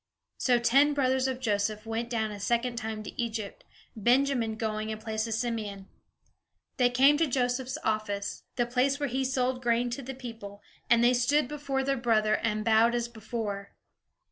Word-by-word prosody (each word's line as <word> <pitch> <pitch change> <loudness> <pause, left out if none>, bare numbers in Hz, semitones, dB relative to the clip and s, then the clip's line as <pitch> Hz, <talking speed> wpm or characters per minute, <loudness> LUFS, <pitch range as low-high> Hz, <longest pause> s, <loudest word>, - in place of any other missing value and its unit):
So 250 -2 +3
ten 275 +5 +4
brothers 260 -1 +2
of 260 -1 -3
Joseph 215 -2 -1
went 225 +1 -3
down 220 -2 -1
a 205 - -7
second 235 +4 0
time 220 -2 -4
to 210 - -5
Egypt, 220 -3 -4 0.3
Benjamin 240 0 +2
going 215 -1 -3
in 215 - -3
place 220 +1 -3
of 225 - -1
Simeon. 215 -4 -3 0.9
They 245 -1 +4
came 270 +4 +5
to 325 - +3
Joseph's 255 +1 -1
office, 205 -2 -2
the 240 - +1
place 255 +3 +1
where 285 -1 -1
he 265 +2 -1
sold 255 -1 0
grain 240 0 +1
to 275 - -4
the 265 +1 -7
people; 225 -5 -9 0.3
and 235 0 +5
they 245 +1 +5
stood 255 +3 +2
before 280 -2 -2
their 275 0 0
brother, 215 -3 +2
and 215 -2 -2
bowed 230 +1 +4
as 240 0 -1
before. 220 -3 -5
235 Hz, 175 wpm, -29 LUFS, 220-255 Hz, 0.9 s, came